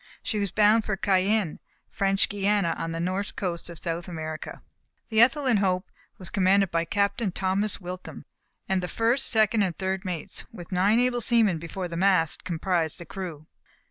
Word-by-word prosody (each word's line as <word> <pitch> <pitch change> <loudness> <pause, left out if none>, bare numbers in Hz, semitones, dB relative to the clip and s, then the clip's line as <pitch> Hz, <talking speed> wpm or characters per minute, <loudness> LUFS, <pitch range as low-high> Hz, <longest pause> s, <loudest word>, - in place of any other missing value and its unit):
She 215 - -2
was 200 -1 0
bound 215 +3 +4
for 210 -2 -2
Cayenne, 195 -2 +1 0.3
French 195 0 +1
Guiana, 200 -3 +1
on 165 - -4
the 165 - -4
north 185 +4 -2
coast 175 -3 -3
of 170 - -8
South 170 +1 -3
America. 160 -3 -6 0.5
The 220 -1 +4
Ethelyn 255 -1 +4
Hope 185 -2 0 0.3
was 185 - -8
commanded 195 -2 +3
by 165 0 0
Captain 200 +3 0
Thomas 195 +3 0
Witham; 180 0 -8 0.4
and 190 -1 +1
the 180 - -3
first, 230 +7 +2
second 220 -1 +3
and 185 -4 -1
third 190 0 -2
mates, 180 -5 -4
with 175 -6 -11
nine 195 +5 +3
able 245 -1 +1
seamen 220 -7 +3
before 175 +3 -5
the 170 -1 -6
mast 185 -4 +2
comprised 170 -2 -1
the 170 - -8
crew. 165 -4 -7
190 Hz, 175 wpm, -26 LUFS, 175-210 Hz, 0.5 s, bound